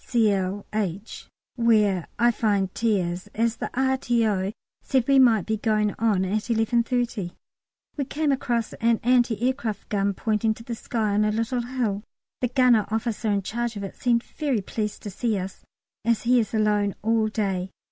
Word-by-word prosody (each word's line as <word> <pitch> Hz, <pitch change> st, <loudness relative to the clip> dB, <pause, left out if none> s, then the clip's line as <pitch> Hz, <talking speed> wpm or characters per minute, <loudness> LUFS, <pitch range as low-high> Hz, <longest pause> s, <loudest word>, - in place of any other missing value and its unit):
Cl. 205 Hz, -4 st, +1 dB
H. 205 Hz, 0 st, -3 dB, 0.3 s
(where 210 Hz, -6 st, +3 dB
I 240 Hz, +1 st, +4 dB
find 200 Hz, -4 st, 0 dB
T. 225 Hz, -3 st, +1 dB
is), 180 Hz, +3 st, -4 dB
as 230 Hz, +1 st, +1 dB
the -, -, -4 dB
R.T.O. 235 Hz, -7 st, +1 dB, 0.3 s
said 260 Hz, -3 st, 0 dB
we 275 Hz, -1 st, +5 dB
might 230 Hz, -6 st, +5 dB
be 220 Hz, 0 st, -1 dB
going 215 Hz, -1 st, +1 dB
on 210 Hz, -5 st, +2 dB
at 210 Hz, +3 st, -1 dB
11.30. 230 Hz, -3 st, 0 dB, 0.6 s
We 280 Hz, -, -1 dB
came 295 Hz, +2 st, 0 dB
across 240 Hz, -4 st, -1 dB
an 230 Hz, 0 st, +1 dB
anti 240 Hz, -2 st, +3 dB
aircraft 235 Hz, -6 st, -2 dB
gun 200 Hz, -1 st, 0 dB
pointing 220 Hz, +1 st, 0 dB
to 230 Hz, -, -12 dB
the 235 Hz, -, -5 dB
sky, 220 Hz, -2 st, -2 dB
on 210 Hz, +1 st, +3 dB
a 210 Hz, -, +2 dB
little 230 Hz, +3 st, -1 dB
hill. 235 Hz, -5 st, -2 dB, 0.4 s
The 250 Hz, -, +1 dB
gunner 245 Hz, -4 st, +3 dB
officer 220 Hz, 0 st, -1 dB
in 200 Hz, -1 st, +1 dB
charge 235 Hz, +3 st, -3 dB
of 200 Hz, -, -5 dB
it 195 Hz, -, -6 dB
seemed 235 Hz, -1 st, +1 dB
very 280 Hz, -8 st, -2 dB
pleased 210 Hz, +2 st, -4 dB
to 205 Hz, -, -5 dB
see 220 Hz, +2 st, -1 dB
us, 190 Hz, 0 st, -6 dB, 0.4 s
as 230 Hz, 0 st, +1 dB
he 245 Hz, +1 st, +4 dB
is 220 Hz, -, -1 dB
alone 210 Hz, -2 st, +1 dB
all 225 Hz, 0 st, +2 dB
day. 195 Hz, -4 st, -2 dB
220 Hz, 175 wpm, -25 LUFS, 205-240 Hz, 0.6 s, we